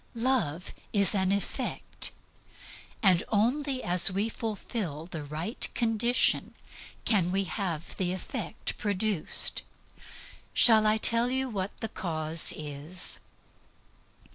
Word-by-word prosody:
Love 225 Hz, -, -1 dB, 0.2 s
is 200 Hz, -1 st, +4 dB
an 190 Hz, -2 st, +1 dB
effect. 200 Hz, 0 st, -2 dB, 0.9 s
And 185 Hz, -4 st, +4 dB
only 255 Hz, +5 st, 0 dB
as 175 Hz, +1 st, +5 dB
we 200 Hz, +4 st, -1 dB
fulfill 205 Hz, -, -5 dB
the 165 Hz, -3 st, -7 dB
right 155 Hz, -, -2 dB
condition 235 Hz, +2 st, +2 dB, 0.5 s
can 185 Hz, -6 st, +2 dB
we 195 Hz, +1 st, +1 dB
have 170 Hz, -2 st, -4 dB
the 180 Hz, -2 st, -1 dB
effect 185 Hz, -, -5 dB
produced. 205 Hz, -4 st, 0 dB, 0.9 s
Shall 220 Hz, -2 st, +6 dB
I 215 Hz, +1 st, +3 dB
tell 230 Hz, +2 st, +3 dB
you 260 Hz, 0 st, -1 dB
what 195 Hz, -3 st, -5 dB
the 225 Hz, -, -2 dB
cause 160 Hz, -3 st, +1 dB
is? 150 Hz, +4 st, 0 dB
195 Hz, 110 wpm, -28 LUFS, 170-225 Hz, 0.9 s, Shall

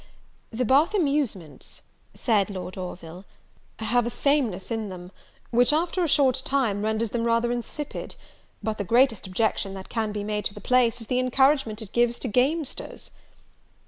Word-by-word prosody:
"The 250 Hz, +2 st, -2 dB
Bath 290 Hz, -, +4 dB
amusements," 275 Hz, -, -2 dB, 0.3 s
said 210 Hz, -5 st, +1 dB
Lord 185 Hz, -2 st, -6 dB
Orville, 180 Hz, -1 st, -7 dB, 0.5 s
"have 235 Hz, +2 st, +1 dB
a -, -, 0 dB
sameness 240 Hz, -8 st, 0 dB
in 220 Hz, -2 st, -2 dB
them, 180 Hz, -1 st, -9 dB, 0.4 s
which, 245 Hz, +3 st, +4 dB
after 340 Hz, +4 st, +1 dB
a -, -, +1 dB
short 270 Hz, -3 st, +3 dB
time, 245 Hz, -8 st, +1 dB
renders 220 Hz, 0 st, -1 dB
them 235 Hz, -1 st, -1 dB
rather 230 Hz, +1 st, +2 dB
insipid; 245 Hz, +5 st, -5 dB, 0.5 s
but 215 Hz, 0 st, -2 dB
the -, -, 0 dB
greatest 235 Hz, 0 st, +3 dB
objection 195 Hz, 0 st, 0 dB
that 190 Hz, 0 st, -9 dB
can 220 Hz, -2 st, -1 dB
be 205 Hz, -1 st, -4 dB
made 210 Hz, -1 st, -2 dB
to 200 Hz, -, -2 dB
the -, -, -8 dB
place, 245 Hz, -2 st, +2 dB
is -, -, -6 dB
the 250 Hz, +3 st, 0 dB
encouragement 255 Hz, -3 st, +2 dB
it 200 Hz, -, -12 dB
gives 240 Hz, 0 st, +2 dB
to -, -, -5 dB
gamesters." 275 Hz, +6 st, -1 dB
230 Hz, 165 wpm, -25 LUFS, 205-265 Hz, 0.5 s, Bath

